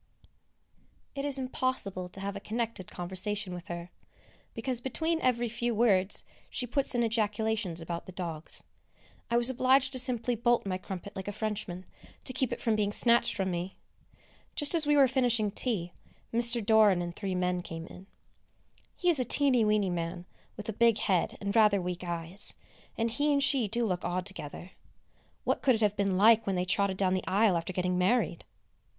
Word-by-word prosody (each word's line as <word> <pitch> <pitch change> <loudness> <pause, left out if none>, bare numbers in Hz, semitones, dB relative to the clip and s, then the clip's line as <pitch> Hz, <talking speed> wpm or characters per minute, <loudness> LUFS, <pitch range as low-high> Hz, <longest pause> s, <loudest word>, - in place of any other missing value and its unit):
It 275 0 -4
is 280 -2 +1
impossible 255 -8 -3
to 195 - -6
have 200 0 -4
a - - -4
connected 225 -3 -4
conversation 190 +2 -2
with 175 +2 -8
her, 175 -1 -7 0.6
because 245 +1 -2
between 320 +6 -1
every 240 -1 +1
few 235 +1 -2
words 200 -4 +3 0.3
she 250 - -1
puts 265 +2 0
in 240 - +2
ejaculations 220 -4 -1
about 170 +2 -6
the - - -8
dogs. 170 -3 -5 0.7
I 235 - +2
was 240 +2 +5
obliged 260 +1 +3
to 260 - +2
simply 245 -1 +2
bolt 240 0 +1
my 185 -1 -2
crumpet 190 +2 -8
like 190 0 -6
a - - -2
Frenchman, 205 -3 -4 0.4
to 255 - -2
keep 260 -1 0
it - - -3
from 225 -3 +1
being 205 -1 0
snatched 235 +2 +3
from 190 -1 -1
me. 175 +2 -4 0.8
Just 290 +1 +3
as 320 -3 +4
we 295 0 +4
were 275 -2 +6
finishing 240 -5 +1
tea, 195 -7 -1 0.4
Mr. 235 -1 +5
Doran 210 -5 +5
and 175 0 -6
three 195 -3 -3
men 180 0 0
came 165 -1 -7
in. 185 +2 -13 0.9
He 360 - -3
is 335 -5 +5
a - - +2
teeny 260 -2 +3
weeny 210 -3 +2
man 175 +1 -4 0.3
with 210 - -7
a 220 - -2
big 230 0 +3
head 185 -5 0
and 200 0 -3
rather 210 -3 +5
weak 180 0 -4
eyes, 170 +2 -3 0.4
and 230 0 0
he 295 +5 +1
and 280 -1 +2
she 270 -5 +3
do 235 +3 -1
look 180 -4 -2
odd 180 0 -2
together. 185 -2 -8 0.7
What - - 0
could 260 -3 +4
it 225 - -4
have 210 -1 +2
been 195 -2 0
like 220 +2 +5
when 195 - 0
they 180 0 0
trotted 195 0 0
down 185 -1 +1
the 185 - -2
aisle 200 -1 +3
after 170 +2 -2
getting 180 0 -1
married! 215 +7 +1
210 Hz, 190 wpm, -29 LUFS, 185-240 Hz, 0.9 s, were